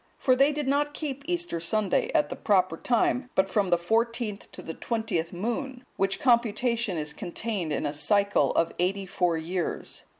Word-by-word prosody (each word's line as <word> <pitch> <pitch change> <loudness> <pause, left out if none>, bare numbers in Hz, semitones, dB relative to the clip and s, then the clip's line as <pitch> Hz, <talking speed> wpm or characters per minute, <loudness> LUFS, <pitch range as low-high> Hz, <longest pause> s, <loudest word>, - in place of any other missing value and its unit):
For 255 - +3
they 275 +3 +4
did 295 -2 -3
not 290 +1 +1
keep 280 -3 -4
Easter 350 - -2
Sunday 190 +4 +1
at 150 0 +3
the - - -4
proper 185 -4 +2
time, 250 +5 +1
but 190 - +3
from 200 -3 +1
the 175 - +4
fourteenth 225 +3 -1
to - - -9
the 165 - -5
twentieth 215 -8 -2
moon; 245 +7 -4
which 195 0 0
computation 235 - +2
is 150 -1 -2
contained 180 -2 -3
in 150 - -1
a 145 - -1
cycle 200 +7 +2
of 165 - +1
eighty 190 +2 0
four 180 -3 0
years. 170 +2 -4
205 Hz, 175 wpm, -27 LUFS, 175-245 Hz, -, they